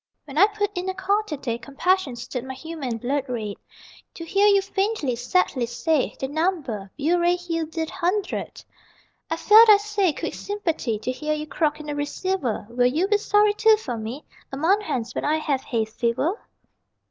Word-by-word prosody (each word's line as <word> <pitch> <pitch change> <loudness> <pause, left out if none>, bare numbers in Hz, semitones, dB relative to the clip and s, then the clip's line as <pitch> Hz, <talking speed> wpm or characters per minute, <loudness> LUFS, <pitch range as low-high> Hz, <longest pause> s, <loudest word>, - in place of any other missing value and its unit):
When 285 -2 -10
I 400 - +8
put 410 -1 -3
in 360 +1 -2
a 375 - -3
call 395 +2 +1
to 300 - -4
day 235 -4 -3
Compassion 280 +3 0
stirred 240 +1 -5
my 265 0 -6
humane 280 -5 -5
blood 270 +4 -1
red 215 -5 -4 0.6
To 330 - -7
hear 395 +4 +3
you 400 -1 +6
faintly, 390 - -1
sadly, 250 -1 0
say 290 +4 0
The 265 - -2
number: 290 - -2
Burray 345 +4 +2
Hill 330 -2 -3
dide 320 0 -4
hudred! 375 +3 -2 0.6
I 325 - 0
felt 435 +6 +7
(I 420 - +9
say) 405 -3 0
quick - - -5
sympathy 335 - -2
To 220 +4 -3
hear 300 +4 -2
you 305 0 -4
croak 305 -1 -1
in 305 - -8
the 295 - -3
receiver 290 - -2
Will 245 +1 +3
you 315 +9 +1
be 415 -1 +3
sorry 415 -1 +3
too 440 +1 +5
for 255 - -5
me 230 +6 -6 0.3
A 270 - -5
month 370 +8 +3
hence, 245 - -3
when - - -3
I 305 +2 +2
have 285 -4 -1
hay 230 -5 -1
fever? 235 - -1
315 Hz, 190 wpm, -24 LUFS, 255-385 Hz, 0.6 s, I